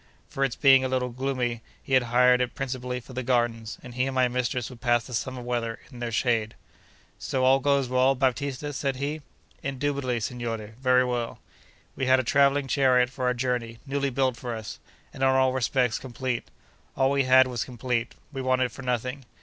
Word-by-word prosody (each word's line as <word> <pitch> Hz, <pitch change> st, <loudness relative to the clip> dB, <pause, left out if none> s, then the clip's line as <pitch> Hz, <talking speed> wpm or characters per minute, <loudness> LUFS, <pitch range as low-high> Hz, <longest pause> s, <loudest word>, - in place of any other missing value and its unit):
For 135 Hz, -, -2 dB
its 135 Hz, -3 st, 0 dB
being 135 Hz, -2 st, +6 dB
a 130 Hz, -, -1 dB
little 125 Hz, -1 st, -1 dB
gloomy, 125 Hz, -2 st, -2 dB, 0.2 s
he 135 Hz, -, -5 dB
had 130 Hz, -, +6 dB
hired 125 Hz, +1 st, +5 dB
it 125 Hz, -, -2 dB
principally 125 Hz, -2 st, -3 dB
for 130 Hz, +2 st, -13 dB
the 130 Hz, -, -3 dB
gardens, 120 Hz, -3 st, 0 dB
and 125 Hz, -, -9 dB
he 125 Hz, +2 st, 0 dB
and 135 Hz, -, -4 dB
my 130 Hz, -1 st, +4 dB
mistress 125 Hz, -1 st, -1 dB
would 120 Hz, -, -13 dB
pass 120 Hz, -2 st, +2 dB
the 125 Hz, -, -9 dB
summer 125 Hz, +2 st, -3 dB
weather 120 Hz, -2 st, -2 dB
in 125 Hz, -, -11 dB
their 120 Hz, -1 st, -3 dB
shade. 115 Hz, -2 st, 0 dB, 0.6 s
'So 130 Hz, -1 st, -1 dB
all 135 Hz, +1 st, +5 dB
goes 140 Hz, -1 st, +2 dB
well, 130 Hz, +2 st, +3 dB
Baptista?' 135 Hz, +2 st, -1 dB
said 135 Hz, -1 st, -1 dB
he. 145 Hz, +4 st, -3 dB, 0.4 s
'Indubitably, 135 Hz, -2 st, -1 dB
signore; 115 Hz, -2 st, -4 dB
very 130 Hz, -1 st, +4 dB
well.' 120 Hz, -2 st, -2 dB, 0.6 s
We 130 Hz, -, -2 dB
had 130 Hz, 0 st, +5 dB
a -, -, 0 dB
travelling 140 Hz, +2 st, +3 dB
chariot 125 Hz, -2 st, +3 dB
for 130 Hz, -1 st, -4 dB
our 125 Hz, 0 st, +2 dB
journey, 120 Hz, -2 st, -2 dB
newly 140 Hz, 0 st, -1 dB
built 130 Hz, -1 st, 0 dB
for 120 Hz, -2 st, -4 dB
us, 110 Hz, -1 st, -7 dB, 0.3 s
and -, -, -10 dB
in 135 Hz, -, +4 dB
all 130 Hz, -1 st, +3 dB
respects 125 Hz, -2 st, +1 dB
complete. 130 Hz, -1 st, -3 dB, 0.5 s
All 135 Hz, 0 st, +3 dB
we 140 Hz, -1 st, +2 dB
had 130 Hz, 0 st, +7 dB
was 125 Hz, -3 st, -2 dB
complete; 125 Hz, -1 st, -3 dB, 0.2 s
we 135 Hz, -, -3 dB
wanted 130 Hz, -1 st, +1 dB
for -, -, -10 dB
nothing. 125 Hz, +1 st, -2 dB
130 Hz, 200 wpm, -26 LUFS, 120-135 Hz, 0.6 s, had